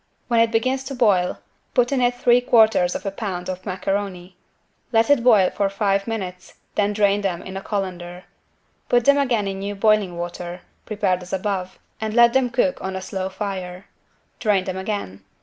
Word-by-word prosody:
When 235 -1 +3
it 230 0 +4
begins 255 +4 0
to 270 +1 -5
boil 200 -7 +2 0.4
put 245 -1 +3
in 270 -2 +1
it 245 0 +2
3/4 245 0 +2
lb. 190 -3 +1
macaroni. 185 -1 -3 0.6
Let 225 +3 +3
it 285 -5 +4
boil 215 -7 +5
for 200 -1 0
five 195 0 0
minutes, 185 -5 -5 0.2
then 205 0 +1
drain 205 -1 +2
them 185 -3 -2
in 190 - -8
a 195 - -4
colander. 180 -3 -4 0.7
Put 240 -1 +3
them 280 0 +5
again 235 -7 +1
in 195 0 -4
new 200 +1 -4
boiling 205 -4 +2
water, 175 +1 -6 0.3
prepared 200 -4 0
as 180 +1 -10
above 190 -1 -2 0.2
and 220 0 -3
let 235 -1 +6
them 265 -2 +2
cook 260 +3 0
on 190 0 -4
a - - -2
slow 190 0 -4
fire. 190 -2 -6 0.5
Drain 205 -4 +2
them 185 0 -4
again. 190 - -4
200 Hz, 170 wpm, -22 LUFS, 185-230 Hz, 0.7 s, let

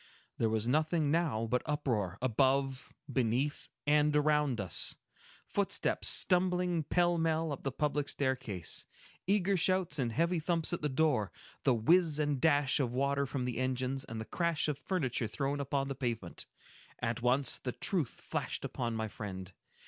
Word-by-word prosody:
There 115 - +2
was 110 0 0
nothing 155 +2 +2
now 155 -9 +1
but 125 +2 0
uproar, 110 -11 -1
above, 135 +2 +1 0.2
beneath, 130 +3 0 0.2
and 150 0 +3
around 150 -4 +2
us; 95 -4 +1 0.5
footsteps - - 0
stumbling 180 -2 +2
pell 175 +2 +2
mell 160 -1 +1
up 140 - -5
the 135 - -2
public 145 +1 -1
staircase, 125 - -2 0.4
eager 200 0 +2
shouts 185 -3 +1
and 120 -3 0
heavy 170 +6 +1
thumps 165 +1 0
at 175 - -2
the 150 - 0
door, 130 - +1 0.3
the 130 - +4
whiz 160 +7 +3
and 145 -3 0
dash 145 -3 +3
of 125 -3 -1
water 140 +1 +1
from 130 -1 -3
the 125 -1 -3
engines, 130 +1 -1
and 115 0 -7
the 110 - -5
crash 170 +1 0
of 145 -2 -2
furniture 130 - -1
thrown 140 +6 -2
upon 140 0 -1
the 135 - -2
pavement. 120 -9 -4 0.5
At 115 0 -2
once, 125 +1 +2
the 125 - -3
truth 160 - 0
flashed - - -3
upon 120 -2 -3
my 110 0 -2
friend. 95 -3 -7
140 Hz, 160 wpm, -32 LUFS, 120-155 Hz, 0.5 s, the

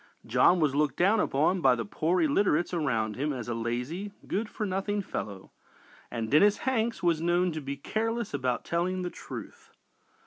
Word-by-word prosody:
John 180 - +4
was 150 -4 +2
looked 145 -2 +1
down 200 +5 +4
upon 165 +3 +2
by 130 -4 +5
the 115 -2 -3
poor 160 - 0
illiterates 200 - +2
around 115 -10 0
him 145 +3 -1
as 125 -4 -5
a 120 - -2
lazy, 125 - -3
good 210 +3 -2
for 215 - -3
nothing 200 +1 -1
fellow, 100 - -6 0.6
and 115 -2 -4
Dennis 200 +8 +5
Hanks 235 -5 0
was 170 -2 +2
known 175 +1 +2
to 155 -1 -4
be 140 0 -5
careless 225 +7 -2
about 130 -3 -1
telling 180 +2 -1
the 175 - -3
truth. - - -9
170 Hz, 175 wpm, -28 LUFS, 135-195 Hz, 0.6 s, by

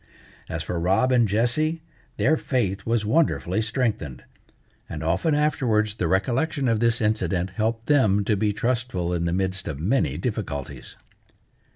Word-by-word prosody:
As 80 0 -3
for 85 +2 -3
Rob 95 +9 +2
and 120 -3 +4
Jessie, 125 +10 0 0.3
their 155 - +3
faith 100 -10 -2
was 115 -2 +1
wonderfully 110 - +1
strengthened, 110 - -2 0.7
and 80 -1 -5
often 95 - +1
afterwards 120 -8 +1
the 90 -6 -2
recollection 130 - 0
of 115 -2 +2
this 115 0 +1
incident 95 -4 0
helped 110 +3 -2
them 110 -9 +3
to 105 - +2
be 105 +1 +1
trustful 105 -5 -1
in 85 -1 -1
the 85 - 0
midst 95 0 -1
of 70 -4 -4
many 115 - +1
difficulties. 100 - -5
110 Hz, 150 wpm, -24 LUFS, 95-125 Hz, 0.7 s, and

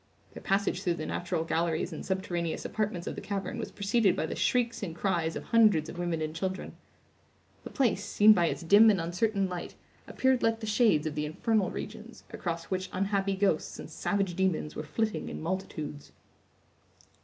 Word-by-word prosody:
Their - - -9
passage 195 -1 0
through 175 -3 0
the 155 - -5
natural 175 -2 -2
galleries 165 +1 -1
and 155 - -6
subterraneous 175 -3 -2
apartments 210 -5 -2
of - - -3
the - - -7
cavern 200 +2 -4
was 225 - -4
preceded 200 0 +2
by - - -1
the - - -4
shrieks 235 -2 +1
and 170 -6 -4
cries 170 -4 0
of - - -5
hundreds 210 -9 +4
of 175 - -8
women 170 -2 -1
and 155 0 -4
children. 185 +2 -4 0.9
The - - -7
place, 235 -8 +1
seen 210 +1 +6
by 175 -4 +2
its 165 - -3
dim 205 +6 +7
and 200 -3 +3
uncertain 195 +4 0
light, 180 -2 -6 0.3
appeared 260 -1 +2
like 225 0 +2
the 225 - -5
shades 210 -8 +3
of 155 - -2
the 150 0 -2
infernal 205 +5 +1
regions, - - -8
across 170 -1 -4
which 185 0 -2
unhappy 195 +1 0
ghosts 200 +1 0
and - - -9
savage 195 -3 -1
demons 185 -5 0
were - - -3
flitting 215 +9 -2
in - - -6
multitudes. 160 -4 -5
190 Hz, 185 wpm, -29 LUFS, 165-210 Hz, 0.9 s, dim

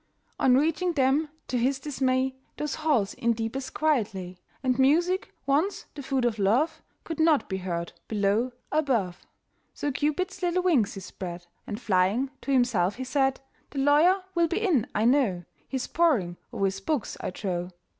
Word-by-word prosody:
On 255 -1 +5
reaching 325 +4 +1
them, 285 +2 +2 0.2
to 250 - -1
his 260 +3 +1
dismay, 260 -2 0 0.2
Those 300 -1 -2
halls 290 -11 +1
in 235 0 +1
deepest 230 +4 -4
quiet 285 -11 +1
lay; 180 -1 -7 0.2
And 255 -1 +1
music, 345 +8 +3
once 310 +9 +1
the 290 - -7
food 265 -2 0
of 225 -2 0
love, 240 +12 +2 0.2
Could 325 -2 -6
not 315 -2 +4
be 190 - -2
heard 170 -2 -4
below, 210 +4 +1 0.2
above. 235 - 0 0.5
So 290 - -2
Cupid's 350 +8 -1
little 360 0 +1
wings 265 - +2
he 195 - -6
spread, 175 -2 -7 0.2
And, 210 - -4
flying, 210 +4 +1
to 275 - -3
himself 230 -8 +2
he 260 - -5
said, 270 0 +1 0.3
"The 285 - -9
lawyer 305 +8 +4
will 340 -1 +3
be 340 - -2
in, 350 - +2
I 215 - +2
know, 235 -9 +3 0.3
He's 265 -2 -2
poring 240 - +1
o'er 195 - 0
his 195 0 -1
books, 255 +3 -2
I - - -2
trow. 180 -2 -3
260 Hz, 170 wpm, -27 LUFS, 205-300 Hz, 0.5 s, On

